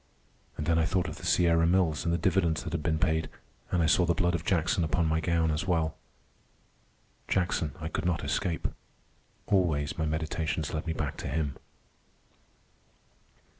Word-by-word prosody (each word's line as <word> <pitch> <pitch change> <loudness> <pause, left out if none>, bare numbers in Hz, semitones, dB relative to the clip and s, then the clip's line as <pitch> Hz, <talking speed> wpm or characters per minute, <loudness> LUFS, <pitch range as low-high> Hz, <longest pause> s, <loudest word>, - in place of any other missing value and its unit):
And 75 - -3
then 80 0 +3
I 80 - +3
thought 90 0 0
of - - -6
the - - -9
Sierra 85 -2 +4
Mills 85 -4 +2
and 85 - +1
the 85 - +2
dividends 85 -3 +1
that 85 -2 -6
had 85 - -1
been 80 +1 0
paid, 80 -3 0 0.4
and 90 -2 +1
I - - +3
saw 90 - +4
the 85 -1 +2
blood 90 -2 +1
of 85 -2 -2
Jackson 90 -1 +1
upon 80 +1 +1
my 80 0 +1
gown 80 0 +1
as 75 +5 -2
well. 80 -3 +1 1.3
Jackson 85 -4 0
I 80 - -4
could 80 - -3
not 90 - 0
escape. 85 -2 -1 0.8
Always 80 -7 +1
my 80 - +1
meditations 80 0 -2
led 80 +1 -3
me 80 - 0
back 75 -4 -3
to - - -5
him. 75 0 -1
80 Hz, 175 wpm, -29 LUFS, 80-85 Hz, 1.3 s, Sierra